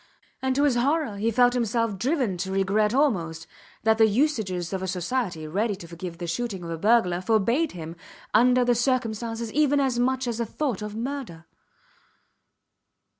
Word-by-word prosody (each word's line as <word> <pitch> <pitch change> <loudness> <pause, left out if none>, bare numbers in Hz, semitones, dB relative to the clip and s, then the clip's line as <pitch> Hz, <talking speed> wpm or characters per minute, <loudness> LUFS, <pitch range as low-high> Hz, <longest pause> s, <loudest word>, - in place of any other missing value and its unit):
And 260 0 0
to 285 - +2
his 290 -3 +4
horror 275 -3 0
he 220 +3 0
felt 245 +2 +4
himself 230 -4 0
driven 255 - 0
to 190 +2 -3
regret 195 +2 +1
almost 175 - 0 0.4
that 220 0 +3
the 220 - +7
usages 210 - 0
of 190 - -2
a 190 - -3
society 180 -2 -2
ready 205 +6 -1
to 175 -3 -11
forgive 170 0 -7
the 175 - -5
shooting 190 +2 -3
of 170 - -6
a 165 - -3
burglar 190 -4 +3
forbade 230 - +1
him, 165 -1 -7 0.4
under 250 +3 +4
the 245 - +4
circumstances, 235 -2 -1
even 290 -1 +3
as 260 -3 +1
much 260 +1 +1
as 235 -1 -3
a 235 - 0
thought 255 -5 -2
of 210 0 -5
murder. 235 -9 -5
225 Hz, 175 wpm, -25 LUFS, 190-250 Hz, 0.4 s, the